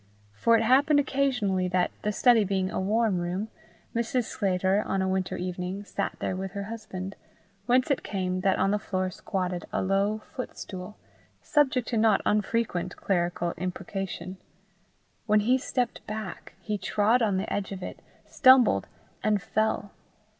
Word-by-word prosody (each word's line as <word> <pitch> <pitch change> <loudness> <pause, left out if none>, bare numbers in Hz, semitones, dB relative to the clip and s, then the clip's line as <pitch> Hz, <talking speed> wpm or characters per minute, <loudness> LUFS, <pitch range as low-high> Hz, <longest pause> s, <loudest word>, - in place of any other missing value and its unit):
For 230 - +4
it 225 - +1
happened 285 +5 +5
occasionally 245 -10 +1
that, 180 0 +1
the 210 - 0
study 230 +1 +5
being 190 -1 -1
a - - -2
warm 210 0 +1
room, 180 +5 -3 0.5
Mrs. 235 +2 +1
Sclater, 190 -1 +1
on 195 - 0
a 190 - +1
winter 190 -1 -1
evening, 180 +2 -4
sat - - -3
there 185 - -2
with 190 0 -5
her 200 -1 -3
husband, 200 -3 -6 0.5
whence 255 +3 +3
it 280 - +1
came 185 -2 -2
that 190 0 +2
on 195 - +2
the 210 - +1
floor 185 -2 -2
squatted 180 -2 -3
a - - 0
low 200 +3 +1
foot 255 - -5
stool, 185 +1 -7 0.5
subject 265 -5 +2
to 235 - 0
not 220 -2 +4
unfrequent 210 -4 0
clerical 175 -2 -1
imprecation: 185 0 -4 0.9
when 210 0 +4
he 250 +5 +3
stepped 250 -2 -2
back, 215 -4 -6
he 210 -2 -3
trod 215 +6 +2
on 205 -4 +2
the 195 - -2
edge 200 -1 -2
of 190 -2 -6
it, - - -7 0.3
stumbled, 255 - +5 0.3
and 210 -1 +2
fell. 215 -1 -1
200 Hz, 160 wpm, -27 LUFS, 185-225 Hz, 0.9 s, happened